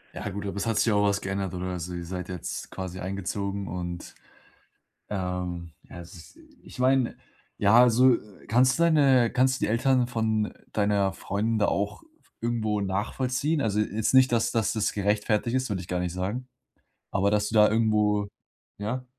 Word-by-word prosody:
Ja, -, -, -4 dB
gut, 100 Hz, +1 st, -6 dB
aber 100 Hz, 0 st, -4 dB
es 100 Hz, -, -2 dB
hat 115 Hz, -2 st, 0 dB
sich 115 Hz, -, +3 dB
auch 105 Hz, 0 st, +3 dB
was 100 Hz, 0 st, 0 dB
geändert 95 Hz, -1 st, -3 dB
oder 90 Hz, 0 st, -4 dB
so. 90 Hz, +2 st, -5 dB
Ihr 85 Hz, -1 st, -5 dB
seid 90 Hz, +1 st, -6 dB
jetzt 90 Hz, -3 st, -5 dB
quasi 95 Hz, -1 st, -6 dB
eingezogen 100 Hz, +1 st, -3 dB
und, 85 Hz, 0 st, -6 dB, 1.0 s
ähm, 90 Hz, -3 st, -4 dB
ja, 90 Hz, -, -11 dB
es 85 Hz, -, -12 dB, 0.2 s
ist -, -, -22 dB, 0.3 s
ich -, -, -11 dB
meine, 130 Hz, -1 st, +2 dB, 0.4 s
ja, 105 Hz, +4 st, +5 dB
also, 125 Hz, +1 st, +5 dB, 0.3 s
kannst 130 Hz, +3 st, +4 dB
du -, -, +2 dB
deine 140 Hz, -8 st, +4 dB
kannst 130 Hz, +1 st, +2 dB
du -, -, +1 dB
die -, -, 0 dB
Eltern 125 Hz, +2 st, +2 dB
von 110 Hz, -3 st, 0 dB, 0.2 s
deiner 100 Hz, -2 st, +1 dB
Freundin 110 Hz, +4 st, -2 dB
da 100 Hz, -, +4 dB
auch 100 Hz, +1 st, -2 dB, 0.4 s
irgendwo 110 Hz, -3 st, -1 dB
nachvollziehen? 125 Hz, +9 st, -1 dB
Also, 105 Hz, -5 st, 0 dB
jetzt 105 Hz, 0 st, 0 dB
nicht, 130 Hz, -1 st, +5 dB
dass 115 Hz, -1 st, +2 dB
dass 110 Hz, -3 st, 0 dB
das 110 Hz, -2 st, 0 dB
gerechtfertigt 105 Hz, +3 st, 0 dB
ist, 130 Hz, -2 st, 0 dB
will 100 Hz, -, -1 dB
ich 90 Hz, -, -8 dB
gar 90 Hz, -1 st, -2 dB
nicht 90 Hz, -1 st, -2 dB
sagen, 100 Hz, +8 st, -4 dB, 0.6 s
aber 100 Hz, 0 st, +2 dB
dass 105 Hz, 0 st, +1 dB
du -, -, -6 dB
da 105 Hz, -1 st, +6 dB
irgendwo 105 Hz, -2 st, +2 dB, 0.5 s
ja? 115 Hz, +5 st, -3 dB
105 Hz, 180 wpm, -26 LUFS, 95-120 Hz, 1.0 s, da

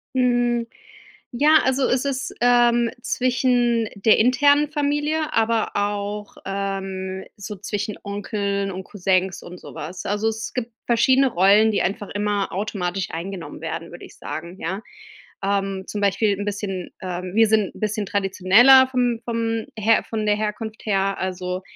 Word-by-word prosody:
Hm, 240 Hz, -2 st, +2 dB, 0.7 s
ja 300 Hz, +6 st, +5 dB
also 265 Hz, 0 st, +2 dB
es 260 Hz, +2 st, 0 dB
ist, 265 Hz, -2 st, -3 dB
ähm, 240 Hz, -1 st, +4 dB
zwischen 245 Hz, -2 st, +1 dB
der 210 Hz, +2 st, +4 dB
internen 285 Hz, +5 st, +4 dB
Familie, 295 Hz, +1 st, 0 dB
aber 225 Hz, 0 st, +1 dB
auch, 205 Hz, 0 st, -3 dB
ähm, 195 Hz, -1 st, -4 dB
so 205 Hz, 0 st, -7 dB
zwischen 205 Hz, +2 st, -4 dB
Onkeln 200 Hz, -1 st, -2 dB
und 185 Hz, 0 st, -6 dB
Cousins 190 Hz, -1 st, 0 dB
und 180 Hz, +1 st, -10 dB
so -, -, -11 dB
was. 175 Hz, +5 st, -7 dB
Also, 205 Hz, +2 st, 0 dB
es 220 Hz, 0 st, -4 dB
gibt 240 Hz, -2 st, -3 dB
verschiedene 260 Hz, +3 st, +4 dB
Rollen, 205 Hz, +4 st, +5 dB
die -, -, +1 dB
einfach 205 Hz, +2 st, -2 dB
immer 205 Hz, -1 st, -1 dB
automatisch 190 Hz, -2 st, -3 dB
eingenommen 170 Hz, -3 st, -6 dB
werden, 165 Hz, +1 st, -5 dB
würde 175 Hz, -, -10 dB
ich -, -, -17 dB
sagen, 170 Hz, +3 st, -7 dB
ja. 190 Hz, +5 st, -3 dB, 0.6 s
Ähm, 195 Hz, -1 st, -1 dB
zum 210 Hz, -, -4 dB
Beispiel 200 Hz, +1 st, +2 dB
'n -, -, -2 dB
bisschen, 195 Hz, -3 st, -4 dB
ähm 180 Hz, 0 st, -5 dB
wir 225 Hz, 0 st, +5 dB
sind 215 Hz, -2 st, +1 dB
'n -, -, -13 dB
bisschen 210 Hz, -1 st, -1 dB
traditioneller 200 Hz, +7 st, +5 dB
vom 245 Hz, -3 st, 0 dB
vom 230 Hz, -1 st, -2 dB
Her 220 Hz, +2 st, +3 dB
von 215 Hz, -1 st, -2 dB
der 210 Hz, 0 st, +3 dB
Herkunft 215 Hz, +1 st, -4 dB
her. 195 Hz, -1 st, 0 dB
Also, 185 Hz, 0 st, -3 dB
210 Hz, 150 wpm, -22 LUFS, 195-240 Hz, 0.7 s, ja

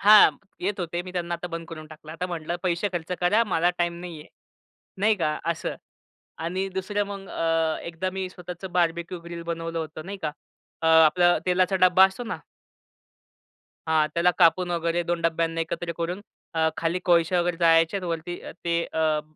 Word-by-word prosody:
हां 210 Hz, +1 st, +8 dB, 0.3 s
येत 195 Hz, +2 st, -2 dB
होते, 175 Hz, 0 st, -2 dB
मी 185 Hz, -, -9 dB
त्यांना 175 Hz, -1 st, -2 dB
आता 170 Hz, +1 st, -5 dB
बंद 165 Hz, -1 st, -6 dB
करून 155 Hz, -2 st, -8 dB
टाकलं. 155 Hz, 0 st, -11 dB
आता 165 Hz, +3 st, -3 dB
म्हंटलं 170 Hz, -1 st, -3 dB
पैसे 185 Hz, +2 st, 0 dB
खर्च 175 Hz, 0 st, -3 dB
करा 205 Hz, +6 st, +4 dB
मला 175 Hz, -4 st, +2 dB
टाईम 175 Hz, 0 st, +1 dB
नाही 175 Hz, -3 st, -7 dB
आहे, -, -, -14 dB, 0.7 s
नाही 215 Hz, +2 st, +4 dB
का 155 Hz, -4 st, 0 dB
असं. -, -, -4 dB, 0.6 s
आणि 185 Hz, +4 st, -2 dB
दुसरं 190 Hz, +2 st, -1 dB
मग 195 Hz, -1 st, -7 dB
अ, 165 Hz, -1 st, +1 dB
एकदा 170 Hz, +2 st, -3 dB
मी 190 Hz, -1 st, -2 dB
स्वतःच 180 Hz, 0 st, -8 dB
बार्बेक्यू 170 Hz, 0 st, 0 dB
ग्रिल 170 Hz, 0 st, -7 dB
बनवलं 165 Hz, 0 st, -3 dB
होतं 155 Hz, 0 st, -6 dB
नाही 200 Hz, +1 st, -6 dB
का? 150 Hz, -, -1 dB, 0.5 s
अ, 160 Hz, -, -1 dB
आपलं 160 Hz, +2 st, +6 dB
तेलाचा 185 Hz, +1 st, +2 dB
डब्बा 185 Hz, +1 st, +7 dB
असतो 195 Hz, +6 st, -4 dB
ना 230 Hz, -, -4 dB, 1.5 s
हां. 155 Hz, -1 st, +3 dB
त्याला 175 Hz, +1 st, +4 dB
कापून 175 Hz, +1 st, +4 dB
वगैरे 170 Hz, 0 st, 0 dB
2 170 Hz, 0 st, -1 dB
डब्यांना 165 Hz, 0 st, 0 dB
एकत्र 170 Hz, +1 st, -3 dB
करून. 175 Hz, +3 st, -2 dB, 0.3 s
अ, 160 Hz, 0 st, +3 dB
खाली 165 Hz, +2 st, 0 dB
कोळशा 175 Hz, 0 st, +4 dB
वगैरे 175 Hz, 0 st, 0 dB
जाळायचे. 165 Hz, +2 st, +4 dB
वरती 170 Hz, +1 st, -3 dB, 0.3 s
ते 170 Hz, 0 st, +1 dB
अ, 155 Hz, -1 st, +2 dB
170 Hz, 175 wpm, -25 LUFS, 165-180 Hz, 1.5 s, हां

